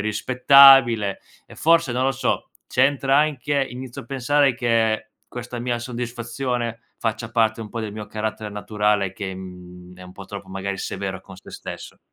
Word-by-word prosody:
rispettabile 125 -1 +5 0.3
e - - -14
forse, 165 -4 +3
non 125 +1 0
lo 135 - +3
so, 130 -1 -2 0.2
c'entra 135 +1 +2
anche 145 -2 +1
inizio 125 0 -8
a - - -16
pensare 140 +1 +2
che 115 -3 0 0.2
questa 120 0 -7
mia 120 -1 -1
soddisfazione 120 0 -4 0.2
faccia 110 0 -3
parte 110 -1 +1
un 110 - -7
po' 115 - -5
del 110 -2 -5
mio 105 0 -7
carattere 110 0 -4
naturale 105 -2 0
che, 95 -1 -5
mhmm, 90 -1 -11
è - - -11
un 90 0 -12
po' 100 - -10
troppo, 100 -1 -9
magari, 95 +1 -4
severo 95 -1 -4
con 95 -1 -14
sé - - -14
stesso. - - -9
115 Hz, 170 wpm, -22 LUFS, 100-125 Hz, 0.3 s, rispettabile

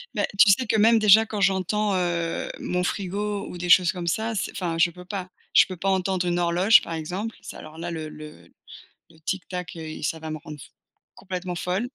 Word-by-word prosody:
Ben, - - +1
tu 200 - +8
sais 250 +6 +2
que 220 - 0
même, 225 +2 +5
déjà, 215 0 +6
quand 210 -1 -4
j'entends, 200 +2 +1
heu, 170 -2 -1
mon 180 0 -2
frigo 200 +2 -3
ou - - -8
des 175 0 -4
choses 180 -1 +6
comme 175 -2 -6
ça, 220 +6 -1
c'est 210 - -2
enfin 170 -3 -3
je 175 - +5
peux 180 +1 -13
pas. 185 -1 -5 0.2
Je - - +7
peux 185 - -7
pas 195 +3 -1
entendre 190 -1 0
une 175 0 0
horloge, 180 +8 +5
par 170 - -6
exemple, 180 +8 -4
ça, - - -9
alors 155 +1 -11
là, 170 +1 -5
le 160 -2 -5
le 155 0 -12 0.6
le 160 - -20
tic 190 +4 -3
tac 180 -2 -6
et 160 -1 -6
i - - -10
ça 160 - -2
va 160 0 -6
me 155 - -4
rendre 150 0 -10
f 120 -3 -12 0.5
complètement 185 -1 -5
folle, 185 +7 -2
180 Hz, 230 wpm, -24 LUFS, 170-200 Hz, 0.6 s, tu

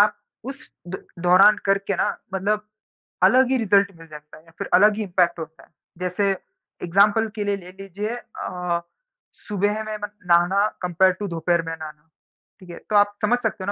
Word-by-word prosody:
आप 205 0 +4 0.3
उस 270 -1 -12 0.2
द 190 - -7 0.2
दौरान 195 +4 +7
करके 195 0 +1
ना - - +1 0.3
मतलब 210 +2 -1 0.6
अलग 255 +6 +5
ही 265 - +3
रिज़ल्ट 200 -3 +3
मिल 165 - -13
जाता 150 -1 -13
है 155 - -19
या 165 - -19
फिर - - -4
अलग 210 +3 +6
ही 220 - -1
इम्पैक्ट 175 -3 +1
होता 160 0 -9
है? - - -22 0.3
जैसे 185 +2 0 0.6
एग्ज़ाम्पल 205 +5 +3
के 210 - -2
लिए 200 0 0
ले 180 -1 -12
लीजिए 205 +4 -5
अ, 180 -7 -4 0.7
सुबह 205 +1 -1
में 215 0 -5
म - - +1 0.2
नहाना 180 +4 +4
कंपेयर्ड 180 +1 +2
टू 205 - -4
दोपहर 170 0 0
में 165 - -3
नहाना, 155 -1 -11 0.5
ठीक 185 - -15
है। 170 - -8
तो 215 - 0
आप 205 0 +4
समझ 240 +3 +3
सकते 220 -5 -3
हो - - -4
195 Hz, 190 wpm, -23 LUFS, 175-210 Hz, 0.7 s, दौरान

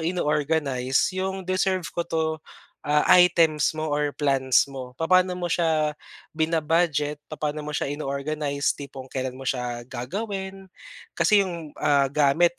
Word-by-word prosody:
ino-organize 150 -6 0
'yong 190 0 -3
deserve 185 0 0
ko 170 - -1
'to, 160 -1 0 0.6
ah, 150 0 +3 0.2
items 165 -4 +4
mo 155 - -1
or 145 -1 0
plans 135 -3 +2
mo? 135 -2 -8
Papaano 185 +2 +3
mo 175 - -2
siya, 160 -3 +1 0.4
bina-budget, 160 -2 0
papaano 150 -1 -3
mo 150 - -6
siya 150 - -2
ino-organize, 140 0 -2
tipong 135 -2 -9
kailan 130 -1 -4
mo 135 - -8
siya 120 -2 -3
gagawin? 190 - -5 0.5
Kasi 205 -2 +4
'yong, 170 -4 -7
ah, 140 -3 +2
gamit 150 +4 +3
150 Hz, 135 wpm, -25 LUFS, 140-175 Hz, 0.6 s, items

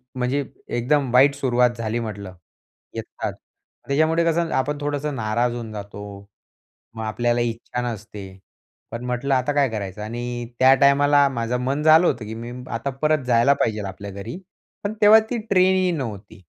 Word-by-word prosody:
म्हणजे 130 +3 -1 0.3
एकदम 135 +2 +1
वाईट 140 +2 +6
सुरुवात 125 -3 +2
झाली 115 0 -2
म्हटलं, 100 -4 -6 0.6
येताच. - - -5 0.5
त्याच्यामुळं 160 +4 +2
कसं 165 0 0
आपण 145 +3 0
थोडंसं 145 0 -2
नाराज 120 +1 0
होऊन 115 -2 -6
जातो. 100 -1 -8 0.9
मग 110 - -6
आपल्याला 120 +2 0
इच्छा 120 +1 -3
नसते. 105 -2 -8 0.6
पण 115 +1 -6
म्हटलं 125 +2 -1
आता 130 +3 +1
काय 140 -2 +2
करायचं? 105 -1 -5
आणि 120 +2 -5
त्या 130 +1 +7
टायमाला 140 0 +5
माझं 120 -1 -2
मन 140 +3 -1
झालं 160 +3 +6
होतं 115 - 0
की 110 +1 -6
मी 120 +1 -7 0.2
आता 120 +4 -2
परत 155 -2 +2
जायला 120 +3 +4
पाहिजेल 105 -2 -1
आपल्या 100 +1 -7
घरी. 100 - -7 0.5
पण 205 - -1
तेव्हा 215 +2 +8
ती 245 - -1
ट्रेनही 185 -1 +3
नव्हती. 110 - -6
125 Hz, 155 wpm, -22 LUFS, 110-145 Hz, 0.9 s, तेव्हा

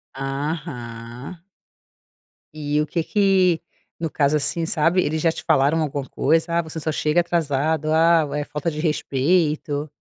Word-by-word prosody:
Aham. 135 -1 -5 1.1
E 150 0 -1
o 150 - +1
que 165 +1 -2
que 190 -4 +2 0.4
no 165 -1 -2
caso, 145 0 +2
assim, 165 +3 -1
sabe, 165 +3 +2
eles 155 +1 -1
já 165 0 +3
te - - -8
falaram 145 +4 +3
alguma 140 -2 -3
coisa? 160 +4 +1
"Ah, - - +3
você 160 0 -7
só 155 +1 -2
chega 155 +3 +2
atrasado. 155 -2 0
Ah, 160 -1 +4
é 150 - -1
falta 150 +2 -3
de 155 -1 -6
respeito". 150 -1 0
155 Hz, 150 wpm, -22 LUFS, 145-165 Hz, 1.1 s, Ah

